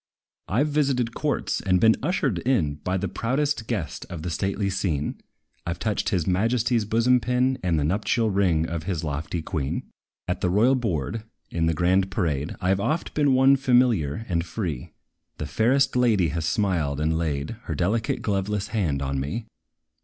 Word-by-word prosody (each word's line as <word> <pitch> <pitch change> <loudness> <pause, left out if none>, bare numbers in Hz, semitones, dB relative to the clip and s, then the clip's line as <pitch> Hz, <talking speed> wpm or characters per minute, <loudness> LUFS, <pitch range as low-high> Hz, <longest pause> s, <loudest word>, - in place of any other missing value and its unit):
I 115 +9 +2
've - - 0
visited 135 -6 +1
courts, 145 0 -1
and 90 -2 +2
been 110 +2 +5
ushered 135 - 0
in 85 - +1
By 95 +1 0
the 100 +2 -2
proudest 125 +5 -1
guest 85 - -3
of 80 -3 -6
the 90 - -3
stately 100 +4 -1
scene; 85 -7 -2 0.4
I 85 - -2
've - - -12
touched 105 +3 -1
his 90 -5 0
majesty's 115 +4 +1
bosom 115 +4 +3
pin, 125 +3 +1
And 90 -3 +1
the - - 0
nuptial 105 +6 +1
ring 90 -5 +2
of 80 -1 -4
his 90 -5 -2
lofty 75 +2 -3
queen. 75 -5 -2 0.4
At 90 0 -2
the 90 - +1
royal 110 +8 +4
board, 110 - -2 0.3
in 80 -1 0
the 80 - +1
grand 95 +3 +2
parade, 80 -7 -1
I 90 +1 +2
've 95 - -1
oft 155 +11 -1
been 145 -3 +3
one 135 +1 +6
familiar 120 - +2
and 85 -3 0
free: 80 - -4 0.5
The 75 - -4
fairest 120 - +2
lady 110 -9 +3
has 80 +1 -2
smiled, 85 - 0
and 80 +1 +1
laid 80 +4 -2
Her 80 - -3
delicate, 110 - 0
gloveless 100 0 -1
hand 80 -11 0
on 70 0 -1
me. 80 - -3
95 Hz, 180 wpm, -25 LUFS, 80-115 Hz, 0.5 s, one